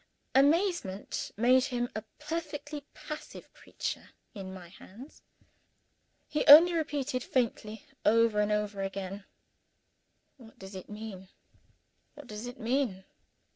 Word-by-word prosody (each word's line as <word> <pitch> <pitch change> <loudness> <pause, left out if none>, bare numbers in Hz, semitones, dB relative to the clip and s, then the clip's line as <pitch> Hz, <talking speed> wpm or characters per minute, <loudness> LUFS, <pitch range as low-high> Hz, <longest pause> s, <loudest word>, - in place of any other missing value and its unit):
Amazement 285 - +1
made 250 +3 +5
him 245 -2 -1
a 215 - -2 0.2
perfectly 300 -1 -5
passive 305 0 -9
creature - - -6 0.2
in 195 -4 -7
my 185 -2 -10
hands. 225 - -14 1.1
He 300 - 0
only 330 +5 +10
repeated 290 -5 -1
faintly, 220 -3 -2 0.2
over 225 0 +4
and 210 0 +2
over 210 -1 -1
again, 195 0 -5 1.1
"What 230 -4 -16
does 190 +1 -10
it 185 -1 -9
mean? 210 -3 -8 0.9
what 295 -1 -11
does 215 0 -7
it 245 +2 -9
mean?" 230 -5 -1
230 Hz, 115 wpm, -30 LUFS, 205-285 Hz, 1.1 s, only